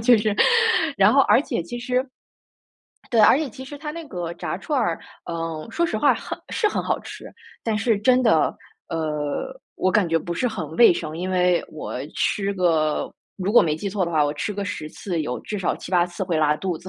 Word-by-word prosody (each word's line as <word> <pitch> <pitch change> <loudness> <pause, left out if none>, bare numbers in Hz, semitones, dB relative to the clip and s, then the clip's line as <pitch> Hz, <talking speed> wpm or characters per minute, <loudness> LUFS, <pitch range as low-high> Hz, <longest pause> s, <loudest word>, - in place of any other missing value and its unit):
就 230 +1 +5
是 210 -1 0 0.6
然 - - +6
后 - - +6
而 - - +5
且 275 - -3
其 240 +8 -7
实 250 +1 -1 1.1
对， 230 - +4
而 215 - +7
且 305 -3 -2
其 260 +2 -10
实 290 +2 -9
它 300 +1 -5
那 335 +2 -7
个 175 -6 -4
炸 - - -4
串 285 +8 -1
儿， 170 -8 0 0.3
嗯， 165 +2 -4
说 340 +8 0
实 220 - -2
话 280 +6 +4
很 - - -6
是 430 - +1
很 - - -2
好 - - 0
吃， - - -10 0.4
但 225 -2 0
是 210 0 +1
真 255 +4 +3
的 225 - +3 0.3
呃， 155 - -3 0.2
我 185 - +1
感 195 -3 +2
觉 165 0 +2
不 170 +2 -5
是 250 +7 0
很 160 -8 -5
卫 235 - +7
生。 160 -2 -5
因 180 +2 -3
为 180 -1 +2
我 155 - -7 0.2
吃 200 -1 0
个 160 -5 +1 0.2
如 195 +1 -2
果 240 - +7
没 155 -2 0
记 200 +5 -4
错 195 -1 -1
的 170 - -4
话， 155 -2 +3
我 145 - 0
吃 150 +8 -3
个 200 0 -4
10 170 -5 -5
次 175 -5 -4
有 125 -5 -3
至 210 - -5
少 190 - 0
7、8 175 -1 +1
次 180 +2 -5
会 170 -3 -1
拉 150 -1 +3
肚 180 0 -3
子， 185 - -11
185 Hz, 230 characters per minute, -23 LUFS, 165-230 Hz, 1.1 s, 而